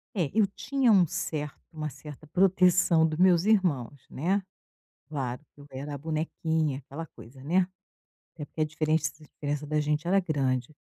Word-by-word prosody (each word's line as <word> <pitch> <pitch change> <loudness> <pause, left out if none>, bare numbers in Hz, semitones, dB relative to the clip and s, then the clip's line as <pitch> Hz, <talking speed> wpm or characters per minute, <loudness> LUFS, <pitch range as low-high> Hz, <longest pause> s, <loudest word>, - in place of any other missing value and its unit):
É, 170 -7 +1
eu 215 -1 +4
tinha 255 +4 +1
um 185 -5 +6
certo 150 -1 -4
uma 155 -1 -3
certa 150 +2 -11
proteção 180 -2 +4
do 155 0 -3
meus 180 0 +5
irmãos, 155 - +2
né. 190 +7 0 0.6
Claro 135 -3 -4
que 145 - -18
eu 145 - -12
era 140 +3 -6
a 140 - -5
bonequinha, 160 -1 -1
aquela 145 +4 -8
coisa, 130 +2 -14
né, 180 +4 +3 0.7
até 150 - -6
porque 155 - -9
a - - +4
diferença 155 0 0
a - - -14
diferença 145 0 -4
da 150 0 +1
gente 150 +2 -1
era 195 +2 +4
grande. 135 -6 -1
155 Hz, 170 wpm, -28 LUFS, 145-180 Hz, 0.7 s, um